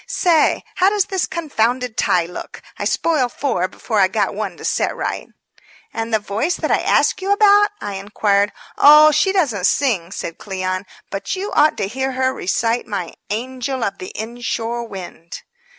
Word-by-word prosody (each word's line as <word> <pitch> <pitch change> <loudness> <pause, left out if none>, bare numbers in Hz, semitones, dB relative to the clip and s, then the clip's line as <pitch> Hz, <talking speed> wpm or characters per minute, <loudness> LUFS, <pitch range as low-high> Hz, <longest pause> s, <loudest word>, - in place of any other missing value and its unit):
Say, 335 -4 +2
how 375 +1 +5
does 410 -1 +1
this 380 -2 -1
confounded 250 -6 -1
tie 175 -2 +2
look? 180 - -9 0.2
I - - -2
spoiled 295 -7 +1
four 185 -10 -1
before 215 +3 -3
I 190 - +5
got 190 - -1
one - - -4
to - - -9
set - - 0
right." - - -4 0.7
"And 225 0 -3
the 220 - +4
Voice 215 - -2
that - - -2
I - - +3
asked - - +2
you 390 +1 -1
about?" 410 0 +5
I 205 - -4
inquired. 200 +1 +1 0.3
"Oh, 300 +1 +8
she 305 +6 +2
doesn't 255 - +1
sing," 205 -11 0
said 165 -3 -6
Cleon. 185 -1 -3 0.2
"But 195 - -3
you 390 +2 -4
ought 300 +1 +3
to 200 - -1
hear 265 +5 -3
her 260 0 0
recite 230 +6 -1
my 195 -6 -4 0.2
'Angel 255 +3 -3
of 195 -1 -3
the 185 - -7
Inshore 235 +1 -4
Wind.'" 180 -4 -9
235 Hz, 175 wpm, -19 LUFS, 200-300 Hz, 0.7 s, Oh